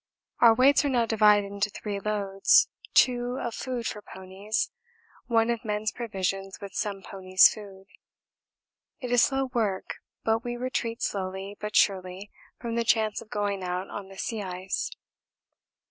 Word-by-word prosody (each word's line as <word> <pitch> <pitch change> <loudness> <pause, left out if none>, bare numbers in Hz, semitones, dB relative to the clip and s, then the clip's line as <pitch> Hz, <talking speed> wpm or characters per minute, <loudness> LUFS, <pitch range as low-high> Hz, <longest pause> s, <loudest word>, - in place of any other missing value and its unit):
Our 230 -2 +7
weights 270 +4 +5
are 285 - +1
now 245 -3 +2
divided 210 -2 +4
into 200 +1 -2
three 205 0 -5
loads: 200 -2 +3 0.3
two 245 0 +3
of 235 - -3
food 250 -1 -4
for 210 - -4
ponies, 190 +3 -4 0.6
one 230 -1 +3
of 235 -2 -3
men's 210 0 -1
provisions 195 -4 -3
with 200 -2 -9
some 200 -1 -3
ponies' 185 -1 +5
food. 195 -2 -11 1.1
It 250 -3 -5
is 245 -1 +5
slow 270 -1 0
work, 210 -5 -1 0.3
but 225 +1 +1
we 240 0 -4
retreat 240 -2 -3
slowly 190 +1 -3
but 210 0 -5
surely 190 0 +1 0.3
from 235 -1 -4
the 235 - +2
chance 220 -2 +1
of - - -14
going 205 -2 -2
out 180 +1 -3
on 200 -1 -6
the 195 - -12
sea 225 0 -3
ice. 185 0 -3
210 Hz, 155 wpm, -27 LUFS, 195-230 Hz, 1.1 s, Our